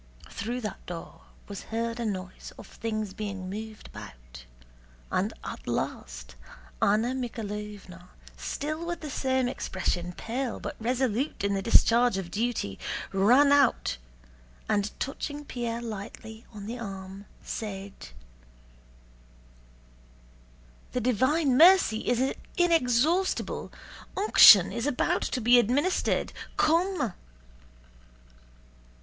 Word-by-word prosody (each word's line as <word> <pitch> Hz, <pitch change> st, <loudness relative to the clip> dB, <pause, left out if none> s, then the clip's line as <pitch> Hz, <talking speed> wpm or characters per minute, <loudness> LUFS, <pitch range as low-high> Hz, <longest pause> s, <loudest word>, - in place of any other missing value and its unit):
Through 240 Hz, +5 st, -4 dB
that 210 Hz, -3 st, -6 dB
door 170 Hz, -2 st, -8 dB, 0.3 s
was 200 Hz, -2 st, -8 dB
heard 230 Hz, +1 st, -2 dB
a 235 Hz, -, -2 dB
noise 185 Hz, -2 st, -6 dB
of -, -, -10 dB
things 215 Hz, -3 st, -4 dB
being 195 Hz, -3 st, -5 dB
moved 215 Hz, +1 st, -7 dB
about, -, -, -12 dB, 0.7 s
and -, -, 0 dB
at -, -, -8 dB
last 60 Hz, 0 st, -4 dB, 0.5 s
Anna 215 Hz, +4 st, +3 dB
Mikháylovna, 210 Hz, -7 st, -6 dB, 0.3 s
still 310 Hz, +3 st, -4 dB
with 345 Hz, 0 st, -4 dB
the 300 Hz, -3 st, -6 dB
same 260 Hz, -1 st, 0 dB
expression, 180 Hz, -6 st, -2 dB
pale 245 Hz, +6 st, -4 dB
but -, -, -6 dB
resolute 250 Hz, +1 st, -1 dB
in 200 Hz, 0 st, +1 dB
the 195 Hz, -, -1 dB
discharge 235 Hz, 0 st, +4 dB
of 180 Hz, -3 st, -5 dB
duty, 210 Hz, -, -2 dB, 0.3 s
ran 245 Hz, +9 st, +5 dB
out 280 Hz, -, +3 dB, 0.7 s
and 205 Hz, 0 st, +1 dB
touching 290 Hz, +2 st, -4 dB
Pierre 235 Hz, -3 st, -4 dB
lightly 220 Hz, +1 st, -8 dB
on 205 Hz, -3 st, -9 dB
the 235 Hz, +3 st, -5 dB
arm 195 Hz, -2 st, -8 dB, 0.2 s
said: 200 Hz, -2 st, -5 dB, 3.0 s
"The 250 Hz, -, 0 dB
divine 260 Hz, +4 st, +2 dB
mercy 335 Hz, -8 st, +5 dB
is 250 Hz, +2 st, +1 dB, 0.2 s
inexhaustible! 335 Hz, +1 st, +1 dB, 0.5 s
Unction 220 Hz, -, +8 dB
is 235 Hz, +3 st, -2 dB
about 285 Hz, -4 st, +1 dB
to -, -, -2 dB
be 240 Hz, +1 st, +6 dB
administered. 275 Hz, -, +1 dB, 0.2 s
Come." 335 Hz, -, +2 dB
230 Hz, 110 wpm, -28 LUFS, 200-260 Hz, 3.0 s, Unction